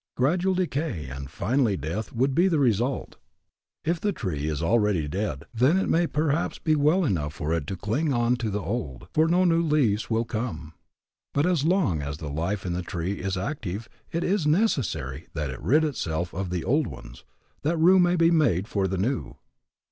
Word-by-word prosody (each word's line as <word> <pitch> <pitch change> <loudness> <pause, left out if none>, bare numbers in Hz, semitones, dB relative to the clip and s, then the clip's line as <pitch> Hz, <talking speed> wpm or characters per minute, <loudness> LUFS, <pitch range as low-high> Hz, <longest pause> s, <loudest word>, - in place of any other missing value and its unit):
Gradual 180 +8 +2
decay 155 - -2
and 70 0 -7
finally 115 0 +1
death 85 +9 -4
would 130 +4 +1
be 175 +7 +4
the 170 -4 +2
result. 125 -1 0 0.7
If 165 +1 0
the 210 - +1
tree 90 - -3
is 75 0 -2
already 105 -5 +2
dead, 85 -5 -3
then 130 +10 +3
it 190 - +1
may 170 +1 +3
perhaps 155 +1 0
be 155 -2 +1
well 155 +5 +3
enough 75 - -1
for 75 +3 -2
it 80 -3 -2
to 95 - -3
cling 115 - -1
on 120 -1 +2
to 115 -3 -2
the 105 -1 -2
old, 80 - -4
for 155 +1 +4
no 180 +2 +3
new 165 -1 +3
leaves 140 -10 +1
will 115 0 +1
come. 110 -10 -4 0.6
But 145 +2 +3
as 175 -5 +1
long 165 - +2
as 70 +1 -4
the 75 -2 -6
life 90 +7 -2
in 90 - -1
the 90 - -2
tree 90 +2 -3
is 95 0 -2
active, 105 - -4 0.2
it 170 - -1
is 185 -4 +1
necessary 105 - 0
that 75 -4 -2
it 65 - -8
rid 140 - +3
itself 85 - -2
of 95 0 -3
the 90 -2 -2
old 145 +1 +2
ones, - - -10 0.4
that 160 +4 0
room 180 +4 +6
may 175 0 +3
be 165 -1 +4
made 125 - +2
for 100 -3 0
the 95 0 -2
new. 120 +8 -2
115 Hz, 200 wpm, -26 LUFS, -, 0.7 s, room